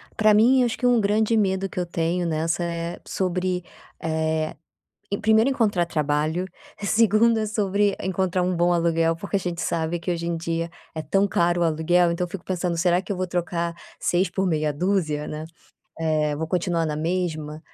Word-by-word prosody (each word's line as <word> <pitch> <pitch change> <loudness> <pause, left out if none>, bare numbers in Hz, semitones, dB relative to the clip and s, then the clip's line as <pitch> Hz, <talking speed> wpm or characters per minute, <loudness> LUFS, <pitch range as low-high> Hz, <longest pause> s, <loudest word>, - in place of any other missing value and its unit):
Pra 215 -1 +4
mim, 245 +5 +5
acho 235 - -1
que 250 - -2
um 245 -2 +5
grande 215 +2 +2
medo 195 -2 +1
que - - -5
eu 180 - 0
tenho 170 +1 -1
nessa 165 +2 0
é 170 0 -4
sobre, 180 -1 -1 0.4
eh, 160 -1 -1 0.6
e 200 - 0
primeiro 220 +4 +4
encontrar 210 -9 +1
trabalho, 155 +3 0 0.4
segundo 220 +2 +4
é 215 - -1
sobre 205 -1 +1
encontrar 185 -1 0
um 180 0 0
bom 175 +1 +3
aluguel, 165 -1 +2
porque 200 +4 -8
a - - +3
gente 175 -2 -3
sabe 165 +1 -1
que 175 +2 -4
hoje 170 -1 -2
em 170 0 -1
dia 165 0 -2 0.2
é 160 - -3
tão 195 +7 +2
caro 175 -2 +1
o - - +4
aluguel, 170 +2 +2
então 175 +1 -1
eu - - -17
fico 185 -1 -7
pensando: 180 -2 -2
"Será 175 +2 +2
que 205 - -14
eu 190 - -3
vou 185 - -1
trocar 170 -1 -2 0.2
seis 180 +1 +1
por 190 +1 -1
meia 155 -3 0
duzia, 155 -2 0
né? 155 +1 -5 0.5
Eh, 155 -2 0
vou 160 +2 -3
continuar 170 -1 0
na 150 -1 -2
mesma?", 155 -2 -2
175 Hz, 195 wpm, -24 LUFS, 165-195 Hz, 0.6 s, mim